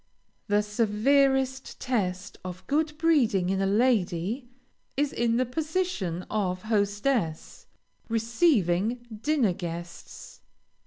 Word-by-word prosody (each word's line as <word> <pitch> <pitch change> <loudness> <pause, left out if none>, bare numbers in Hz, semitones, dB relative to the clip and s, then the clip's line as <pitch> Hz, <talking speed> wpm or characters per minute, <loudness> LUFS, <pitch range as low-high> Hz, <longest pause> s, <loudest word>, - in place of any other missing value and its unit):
The 205 0 +2
severest 265 +5 +1
test 200 -6 -2
of 185 0 -7
good 300 +1 0
breeding 245 - +2
in 195 0 0
a 195 - +2
lady, 215 +1 +1 0.5
is 290 0 +1
in 235 0 +1
the 255 - +2
position 300 - -2
of 185 -4 -1
hostess, 205 -4 -1 0.4
receiving 230 - +1 0.2
dinner 275 -10 +2
guests. 170 -1 -8
220 Hz, 100 wpm, -27 LUFS, 185-265 Hz, 0.5 s, The